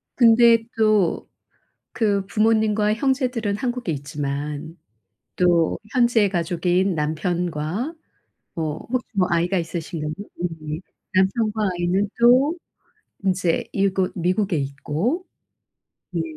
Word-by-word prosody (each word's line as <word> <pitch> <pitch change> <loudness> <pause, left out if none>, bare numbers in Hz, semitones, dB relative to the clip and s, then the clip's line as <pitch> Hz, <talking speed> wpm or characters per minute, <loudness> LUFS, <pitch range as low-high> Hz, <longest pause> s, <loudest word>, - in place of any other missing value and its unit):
근데 235 -1 +6 0.2
또 215 -5 +2 0.7
그 205 -4 +1
부모님과 215 0 +2
형제들은 250 -5 0
한국에 240 -5 -2
있지만 145 +2 -4 0.6
또 175 -2 +3 0.2
현재의 235 -5 +3
가족인 175 +1 0
남편과 170 - -2 0.6
뭐 155 -2 -3
혹시 255 -1 -1
뭐 185 -1 +2
아이가 175 +3 +1
있으신가요? 165 -2 -4 0.3
음 180 - +1
네. 155 +1 -5 0.3
남편과 210 +2 +1
아이는 180 +3 0
또 255 +7 +5 0.7
인제 185 -3 +1
이곳 195 -1 +1
미국에 185 +1 0
있고 150 - -2 0.9
네. 170 -2 -1
190 Hz, 215 characters per minute, -22 LUFS, 165-220 Hz, 0.9 s, 근데